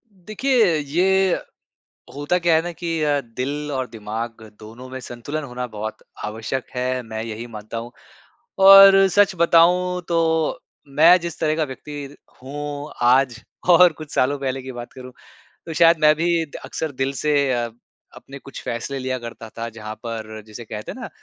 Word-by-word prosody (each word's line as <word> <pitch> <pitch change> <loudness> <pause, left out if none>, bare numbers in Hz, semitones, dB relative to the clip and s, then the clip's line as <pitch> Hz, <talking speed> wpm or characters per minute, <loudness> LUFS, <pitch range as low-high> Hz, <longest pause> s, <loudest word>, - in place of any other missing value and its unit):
देखिए 215 +1 +1
ये 180 +6 +2 0.8
होता 145 +5 0
क्या 170 -2 +3
है 160 - +3
ना 175 +1 -5
कि 165 -1 -3
अ, 145 -1 +2
दिल 140 +5 -5
और 130 -2 -2
दिमाग़ 115 +1 -6 0.2
दोनों 115 +4 -11
में 130 0 -7
संतुलन 125 +5 -6
होना 125 -2 -5
बहुत 110 -1 -7 0.2
आवश्यक 110 +4 -4
है 125 0 -1
मैं 110 -1 -6
यही 115 +1 -6
मानता 110 0 -8
हूँ। 115 +1 -6 0.7
और 195 0 +9
सच 205 +1 +3
बताऊँ 180 +2 +3
तो 160 -2 +1 0.3
मैं 160 +6 +6
जिस 170 -1 -6
तरह 155 -1 +1
का 160 - +1
व्यक्ति 145 +1 -8 0.3
हूँ 145 +2 -6 0.2
आज 125 -2 +3 0.3
और 175 0 +7
कुछ 155 -1 -11
सालों 140 +3 +1
पहले 135 -1 -3
की 130 0 -7
बात 120 -1 -9
करूँ 130 0 -11 0.5
तो 165 - -6
शायद 165 +1 +5
मैं 150 0 +6
भी 170 +1 +1
अ - - -9 0.2
अक्सर 160 -2 -4
दिल 135 0 -2
से 145 -3 +2
अ, 120 -2 -1 0.5
अपने 140 +1 -11
कुछ 135 - -10
फ़ैसले 125 +4 -4
लिया 130 0 -2
करता 115 -1 -9
था 115 0 -4
जहाँ 110 0 -7
पर 110 -2 -6
जिसे 110 +2 -10
कहते 105 0 -7
हैं - - -10
ना - - -7
140 Hz, 170 wpm, -22 LUFS, 120-165 Hz, 0.8 s, और